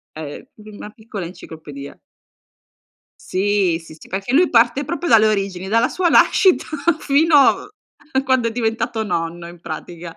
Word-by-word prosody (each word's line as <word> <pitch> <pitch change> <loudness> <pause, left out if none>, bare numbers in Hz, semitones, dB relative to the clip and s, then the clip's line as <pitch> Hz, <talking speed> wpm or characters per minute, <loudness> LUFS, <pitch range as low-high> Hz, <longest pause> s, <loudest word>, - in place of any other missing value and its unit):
È 150 -2 -8
una 210 -1 -11
piccola 215 -5 -8
enciclopedia. 150 -5 -11 1.2
Sì, 190 -3 0
sì, 160 - -13
sì, - - -15
perché 195 +6 -4
lui 335 +6 +4
parte 245 +4 +3
proprio 345 +4 -4
dalle 220 -1 +6
origini, 195 -3 -2
dalla 230 +5 +2
sua 365 -2 0
nascita 370 +2 +4 0.4
fino 300 +3 +2
a 290 -1 +1
quando 260 -3 +1
è 230 - -2
diventato 225 -1 -2
nonno 170 -3 -4
in 175 0 -13
pratica. 170 -1 -8
215 Hz, 140 wpm, -19 LUFS, 175-260 Hz, 1.2 s, dalle